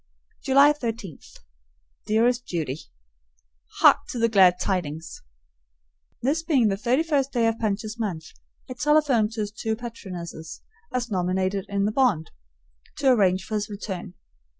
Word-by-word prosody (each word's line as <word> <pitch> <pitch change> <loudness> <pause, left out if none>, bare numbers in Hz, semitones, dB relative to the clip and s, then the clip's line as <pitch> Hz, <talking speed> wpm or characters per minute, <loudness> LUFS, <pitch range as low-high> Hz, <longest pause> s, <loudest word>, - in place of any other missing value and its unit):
July 280 +2 +6
13. 225 - -5 0.9
Dearest 235 +3 +2
Judy: 155 -5 -3 1.0
Hark - - +8
to - - -5
the 230 0 +2
glad 185 -4 +5
tidings! 165 -4 -3 1.0
This 290 +6 +1
being 275 -9 +2
the 195 - 0
thirty 245 +9 +1
first 280 -4 0
day 235 -3 +1
of 225 0 0
Punch's 215 +1 -2
month, 175 -8 -4 0.4
I 255 - -6
telephoned 275 -6 +2
to 225 - -3
his 205 -1 -3
two 220 +1 -3
patronesses, 180 -9 -8 0.3
as 240 -2 -3
nominated 185 +1 -1
in 200 0 0
the 210 - +1
bond, 215 - +1 0.7
to 270 -2 +3
arrange 190 -5 +3
for 220 - -8
his 210 0 -1
return. 190 -3 -6
215 Hz, 140 wpm, -25 LUFS, 185-245 Hz, 1.0 s, Hark